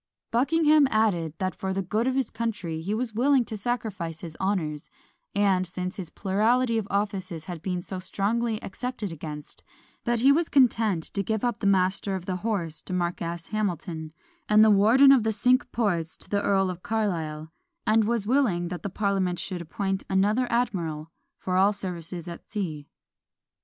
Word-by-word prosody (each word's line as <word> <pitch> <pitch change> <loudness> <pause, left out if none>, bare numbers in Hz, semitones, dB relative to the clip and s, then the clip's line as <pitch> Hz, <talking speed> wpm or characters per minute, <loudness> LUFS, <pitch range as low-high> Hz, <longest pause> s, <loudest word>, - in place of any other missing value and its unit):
" - - -66
Buckingham 300 +4 +4
added, 175 - +1
that 185 -1 -1
for 190 +4 -3
the 195 0 -1
good 220 +6 0
of 260 - +1
his 265 -4 0
country 210 -8 -3
he 185 +5 -4
was 230 0 -2
willing 255 +2 +3
to 220 - -5
sacrifice 200 -7 -3
his 165 -3 -8
honours; 165 -7 -1 0.5
and 195 -3 +2
since 180 +1 -5
his 180 -5 -6
plurality 225 +4 +1
of 205 - -5
offices 190 -5 -2
had 175 -3 -6
been 180 0 -3
so 190 0 -5
strongly 215 +5 -1
excepted 225 -1 -4
against, 150 -2 -7 0.4
that 235 -2 +1
he 270 +3 +6
was 320 +3 +2
content 225 - +3
to 200 - +1
give 220 +1 -2
up 240 -3 -1
the 200 - 0
Master 190 0 +2
of 185 -2 -5
the 185 -1 -2
Horse 180 -6 -2
to - - -7
Marquess 170 -1 -3
Hamilton, 175 -6 -3 0.4
and 210 0 +7
the 220 - +6
Warden 225 +8 +6
of 270 -3 +6
the 220 0 +1
Cinque 250 +5 +2
Ports 175 -8 -1
to - - -14
the 200 0 +1
Earl 195 -2 +2
of 180 0 -9
Carlisle; 165 -8 -2 0.3
and 220 0 +4
was 230 -2 0
willing 210 -9 +1
that 180 -1 -5
the 200 - -4
parliament 195 -2 0
should 180 -1 -4
appoint 195 +3 -2
another 210 +6 +2
admiral 170 -10 -1 0.3
for 185 -1 -1
all 195 +2 +4
services 175 -3 -6
at 170 -1 -8
sea. 160 -9 -4
195 Hz, 180 wpm, -26 LUFS, 175-225 Hz, 0.5 s, and